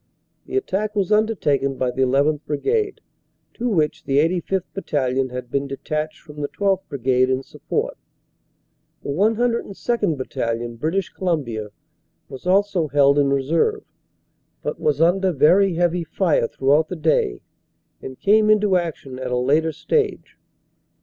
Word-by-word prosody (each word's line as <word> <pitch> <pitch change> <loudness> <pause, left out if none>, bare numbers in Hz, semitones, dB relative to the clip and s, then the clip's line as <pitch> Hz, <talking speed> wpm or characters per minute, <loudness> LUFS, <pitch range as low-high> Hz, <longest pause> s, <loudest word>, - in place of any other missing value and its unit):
The - - -2
attack 210 - -2
was 200 -1 0
undertaken 165 -11 +1
by 125 -1 0
the 130 +1 +1
1 135 +2 +3
1th. 150 0 0
Brigade, 400 - -1 0.5
to 245 +1 -2
which 160 -5 0
the 135 - +1
85th. 175 +4 +1
Battalion 135 -8 -1
had 125 -1 -7
been 140 0 -1
detached 155 +3 -4
from 150 -2 -10
the 145 - -1
12th. 195 +1 0
Brigade 130 -1 +1
in 130 +1 0
support. - - -4 1.0
The - - -6
102nd. 220 0 0
Battalion, 120 -2 -3
British 165 +9 -1
Columbia, 135 - -2 0.6
was 135 +6 -9
also 195 -3 +2
held 140 0 +4
in 140 -1 +3
reserve, 160 - +1 0.8
but - - -3
was 150 -2 0
under 185 +3 +3
very 175 +5 +4
heavy 175 0 +1
fire 160 -5 +1
throughout 145 +6 +2
the 185 - -4
day 155 - 0 0.6
and 130 -1 -9
came 215 +1 +4
into 210 -3 +4
action 150 -7 -5
at 130 -1 -4
a 125 - 0
later 150 +6 +2
stage. 420 - -1
155 Hz, 145 wpm, -22 LUFS, 135-195 Hz, 1.0 s, held